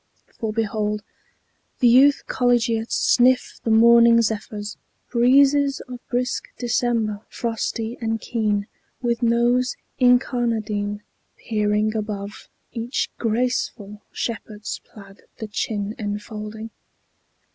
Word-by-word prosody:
For 220 Hz, -2 st, -3 dB
behold 210 Hz, -1 st, -1 dB, 0.7 s
The 250 Hz, -, +4 dB
youth 270 Hz, +4 st, +5 dB
collegiate 235 Hz, -2 st, +1 dB
sniff 250 Hz, +1 st, +3 dB
the -, -, -2 dB
morning 235 Hz, +1 st, +6 dB
zephyrs, 210 Hz, -1 st, -3 dB, 0.4 s
Breezes 275 Hz, +3 st, +4 dB
of 250 Hz, -1 st, -9 dB
brisk 250 Hz, +2 st, -1 dB
December, 235 Hz, -4 st, 0 dB
frosty 230 Hz, 0 st, -3 dB
and 225 Hz, 0 st, -1 dB
keen, 210 Hz, -3 st, -1 dB, 0.4 s
With 235 Hz, 0 st, 0 dB
nose 240 Hz, +2 st, +2 dB, 0.2 s
incarnadine, 230 Hz, -5 st, +1 dB, 0.4 s
peering 210 Hz, 0 st, 0 dB
above 210 Hz, -1 st, -5 dB, 0.2 s
Each 235 Hz, +2 st, -2 dB
graceful 225 Hz, -3 st, -2 dB
shepherd's 215 Hz, -2 st, -5 dB
plaid 200 Hz, -2 st, -14 dB, 0.2 s
the 220 Hz, -, -6 dB
chin 210 Hz, 0 st, -3 dB
enfolding. 210 Hz, +1 st, -6 dB
225 Hz, 95 wpm, -22 LUFS, 210-245 Hz, 0.7 s, morning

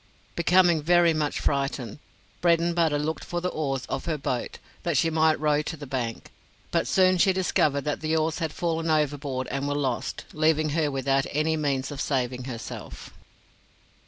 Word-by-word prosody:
Becoming 175 Hz, -1 st, +4 dB
very 170 Hz, +1 st, +4 dB
much 150 Hz, -2 st, -1 dB
frightened, 135 Hz, -3 st, -2 dB, 0.4 s
Bredenbutta 170 Hz, -2 st, +2 dB
looked 155 Hz, +2 st, -2 dB
for 175 Hz, -, -3 dB
the 180 Hz, +1 st, -1 dB
oars 135 Hz, -6 st, -2 dB
of 135 Hz, -, -4 dB
her 160 Hz, -2 st, -1 dB
boat, 130 Hz, -3 st, -3 dB, 0.2 s
that 170 Hz, -4 st, 0 dB
she 165 Hz, +4 st, +2 dB
might 160 Hz, 0 st, +3 dB
row 150 Hz, -1 st, +2 dB
to 160 Hz, +2 st, -5 dB
the 145 Hz, -, -8 dB
bank; 125 Hz, -4 st, -4 dB, 0.4 s
but -, -, +1 dB
soon 185 Hz, -1 st, +4 dB
she 190 Hz, -, +5 dB
discovered 155 Hz, -6 st, +1 dB
that 150 Hz, +1 st, -2 dB
the 160 Hz, 0 st, 0 dB
oars 160 Hz, 0 st, 0 dB
had 160 Hz, -3 st, -2 dB
fallen 165 Hz, -1 st, -2 dB
overboard 145 Hz, -4 st, 0 dB
and 140 Hz, +2 st, -2 dB
were 145 Hz, -, -1 dB
lost, 135 Hz, -4 st, -2 dB
leaving 155 Hz, 0 st, +2 dB
her 150 Hz, 0 st, +1 dB
without 135 Hz, 0 st, 0 dB
any 155 Hz, +2 st, +1 dB
means 140 Hz, -3 st, -1 dB
of 145 Hz, 0 st, -5 dB
saving 125 Hz, -3 st, -1 dB
herself. 120 Hz, -4 st, -8 dB
150 Hz, 170 wpm, -26 LUFS, 140-165 Hz, 0.4 s, she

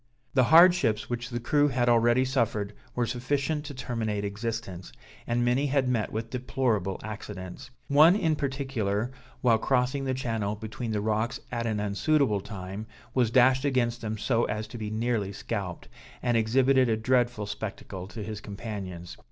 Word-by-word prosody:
The 130 Hz, -3 st, +4 dB
hardships 165 Hz, -8 st, +5 dB
which 120 Hz, 0 st, -3 dB
the 120 Hz, -1 st, -3 dB
crew 145 Hz, +5 st, +3 dB
had 125 Hz, -3 st, 0 dB
already 120 Hz, +2 st, +4 dB
suffered 115 Hz, -6 st, 0 dB, 0.2 s
were 120 Hz, -, +1 dB
sufficient 140 Hz, +5 st, -1 dB
to 145 Hz, -1 st, -7 dB
terminate 110 Hz, -5 st, -2 dB
existence, 100 Hz, -3 st, -5 dB, 0.4 s
and 120 Hz, +1 st, +1 dB
many 130 Hz, +4 st, +2 dB
had 135 Hz, -1 st, +1 dB
met 120 Hz, -4 st, 0 dB
with 110 Hz, +1 st, -4 dB
deplorable 120 Hz, -7 st, -1 dB
accidents. 105 Hz, -1 st, -7 dB, 0.2 s
One 155 Hz, +6 st, +7 dB
in 165 Hz, -7 st, +1 dB
particular, 130 Hz, -6 st, -2 dB, 0.3 s
while 115 Hz, -3 st, +4 dB
crossing 130 Hz, +3 st, +1 dB
the 130 Hz, -1 st, 0 dB
channel 110 Hz, -5 st, -2 dB
between 110 Hz, +2 st, -6 dB
the 105 Hz, -2 st, -1 dB
rocks 110 Hz, +3 st, -1 dB
at 115 Hz, -1 st, -2 dB
an 110 Hz, -2 st, -1 dB
unsuitable 105 Hz, +2 st, +1 dB
time, 95 Hz, +1 st, -7 dB, 0.3 s
was 125 Hz, -4 st, +2 dB
dashed 130 Hz, +2 st, +4 dB
against 125 Hz, -4 st, +1 dB
them 110 Hz, -1 st, -3 dB
so 115 Hz, +2 st, +1 dB
as 105 Hz, +1 st, -3 dB
to 120 Hz, -, -8 dB
be 105 Hz, -1 st, -3 dB
nearly 110 Hz, -2 st, -1 dB
scalped, -, -, -5 dB, 0.4 s
and 120 Hz, -, +2 dB
exhibited 130 Hz, +3 st, +3 dB
a 110 Hz, -, +2 dB
dreadful 120 Hz, -1 st, +1 dB
spectacle 100 Hz, -2 st, -6 dB
to 105 Hz, +1 st, -7 dB
his 110 Hz, 0 st, -6 dB
companions. 100 Hz, -5 st, -7 dB
115 Hz, 160 wpm, -28 LUFS, 105-130 Hz, 0.4 s, One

